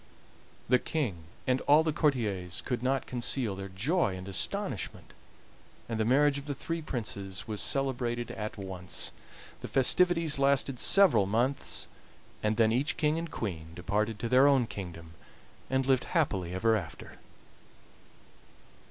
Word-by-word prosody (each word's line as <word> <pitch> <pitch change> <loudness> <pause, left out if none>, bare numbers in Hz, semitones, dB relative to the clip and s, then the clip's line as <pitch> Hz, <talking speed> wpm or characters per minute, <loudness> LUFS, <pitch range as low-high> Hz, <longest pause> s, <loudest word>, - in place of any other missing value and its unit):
The 125 +1 +4
King 110 - -3 0.2
and 130 0 +1
all 150 +2 +6
the 160 -1 0
courtiers 105 - 0
could 125 -3 -2
not 130 +1 0
conceal 120 -3 -1
their 95 0 -7
joy 110 - 0
and 95 +1 -8
astonishment, 95 - -3 0.7
and 115 -1 -3
the 110 - +2
marriage 140 +4 +3
of 140 - -11
the 145 - -3
three 165 +4 -4
Princes 105 -7 -5
was 105 -2 -3
celebrated 120 -3 -1
at 105 0 -5
once. 95 -2 -4 0.5
The - - -6
festivities 165 +2 +3
lasted 135 -2 +2
several 170 - +5
months, 120 +7 +1 0.6
and 105 0 0
then 110 -1 +4
each 130 +6 0
king 155 +1 +1
and 165 0 -5
queen 85 - -5
departed 105 +5 -1
to 115 - -3
their 130 +3 +5
own 135 -4 +4
kingdom 85 -6 -8 0.6
and 130 0 +1
lived 130 -1 +2
happily 100 - 0
ever 110 +4 +3
after. 85 -7 -7
120 Hz, 145 wpm, -30 LUFS, 100-140 Hz, 0.7 s, all